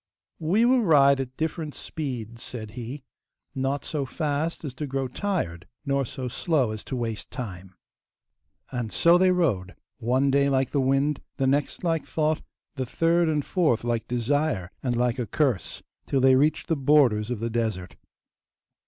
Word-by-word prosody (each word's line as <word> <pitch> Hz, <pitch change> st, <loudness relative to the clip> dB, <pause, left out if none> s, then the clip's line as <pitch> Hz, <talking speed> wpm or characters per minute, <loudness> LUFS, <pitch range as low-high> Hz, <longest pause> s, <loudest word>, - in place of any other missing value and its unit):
'We 190 Hz, +9 st, +3 dB
will 255 Hz, 0 st, +4 dB
ride 140 Hz, -7 st, +5 dB
at 130 Hz, -1 st, -5 dB
different 160 Hz, -1 st, -3 dB
speeds,' 120 Hz, -7 st, -5 dB
said 110 Hz, -4 st, -7 dB
he, 125 Hz, +4 st, -7 dB, 0.5 s
'not 135 Hz, +1 st, -1 dB
so 150 Hz, -3 st, -2 dB
fast 150 Hz, +4 st, -2 dB
as 135 Hz, -, -5 dB
to 145 Hz, +3 st, -5 dB
grow 135 Hz, 0 st, -2 dB
tired 125 Hz, -, -3 dB, 0.2 s
nor 140 Hz, -1 st, +1 dB
so 130 Hz, +2 st, -5 dB
slow 135 Hz, -1 st, 0 dB
as 110 Hz, -1 st, -6 dB
to 130 Hz, -, -4 dB
waste 115 Hz, -3 st, -4 dB
time.' 95 Hz, -6 st, -7 dB, 1.0 s
And 120 Hz, -4 st, -3 dB
so 170 Hz, +1 st, +5 dB
they 185 Hz, 0 st, +5 dB
rode, 125 Hz, -, +1 dB, 0.2 s
one 130 Hz, +4 st, +2 dB
day 140 Hz, 0 st, +3 dB
like 135 Hz, -2 st, +1 dB
the 140 Hz, -, +1 dB
wind, 135 Hz, +2 st, +1 dB, 0.2 s
the 135 Hz, -, +1 dB
next 140 Hz, +5 st, 0 dB
like 165 Hz, -2 st, +1 dB
thought, 155 Hz, 0 st, 0 dB, 0.4 s
the 130 Hz, -, -1 dB
third 165 Hz, +4 st, +2 dB
and 150 Hz, -2 st, 0 dB
fourth 155 Hz, -, +1 dB
like 120 Hz, -1 st, -1 dB
desire 125 Hz, -, 0 dB
and 125 Hz, -2 st, -1 dB
like 120 Hz, +1 st, +1 dB
a 120 Hz, -, -2 dB
curse, 120 Hz, -, -1 dB, 0.2 s
till 135 Hz, -, +1 dB
they 130 Hz, 0 st, +6 dB
reached 150 Hz, +4 st, +2 dB
the 165 Hz, -, +1 dB
borders 130 Hz, -7 st, +3 dB
of 125 Hz, -4 st, -2 dB
the 115 Hz, +1 st, -2 dB
desert. 110 Hz, -6 st, -2 dB
135 Hz, 170 wpm, -26 LUFS, 120-150 Hz, 1.0 s, they